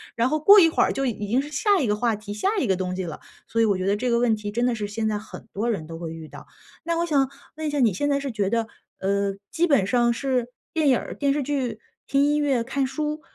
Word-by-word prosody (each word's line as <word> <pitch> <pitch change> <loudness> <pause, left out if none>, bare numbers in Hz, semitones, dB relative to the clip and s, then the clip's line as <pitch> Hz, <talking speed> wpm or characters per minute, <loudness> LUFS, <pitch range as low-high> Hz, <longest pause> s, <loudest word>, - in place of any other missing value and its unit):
然 235 +2 +2
后 310 - 0
过 400 +7 +8
一 335 - +7
会 - - +1
儿 - - +1
就 275 - -1
已 210 -4 -3
经 240 +5 +2
是 290 +2 -4
下 400 +8 +2
一 270 - +1
个 210 -1 +1
话 230 0 +1
题， 205 0 -7
下 210 - -1
一 - - +1
个 190 - +2
东 185 0 -3
西 190 - -3
了。 160 -3 -6 0.3
所 230 - 0
以 225 - +5
我 200 -3 +2
觉 185 - -3
得 200 +1 +2
这 250 +4 -1
个 235 - +3
问 235 -2 +3
题 210 -1 -6
真 240 +4 0
的 250 - +2
是 210 -2 -3
现 220 +1 -2
在 210 -1 -1
很 220 - -11
多 225 +4 -1
人 195 -9 -2
都 165 +1 -8
会 165 -2 -5
遇 160 -1 -9
到。 - - -12 0.4
那 335 0 0
我 340 - +1
想 275 -5 +2 0.3
问 315 -1 -3
一 - - 0
下， 290 -1 -1
你 220 -6 +4
现 290 +10 -1
在 280 0 +2
是 275 -2 -3
觉 205 -3 -1
得， 230 0 0 0.3
呃， 200 0 0 0.2
基 345 +2 +1
本 275 -11 +3
上 240 +2 +2
是 255 -1 -1 0.3
电 315 -3 +1
影 255 - +5
儿， - - -6
电 280 -1 +1
视 290 -2 -1
剧， 255 -6 -2 0.3
听 275 0 +3
音 295 +1 +2
乐， 275 -5 +1
看 270 +2 -1
书， 300 +3 -3
240 Hz, 315 characters per minute, -24 LUFS, 205-285 Hz, 0.4 s, 过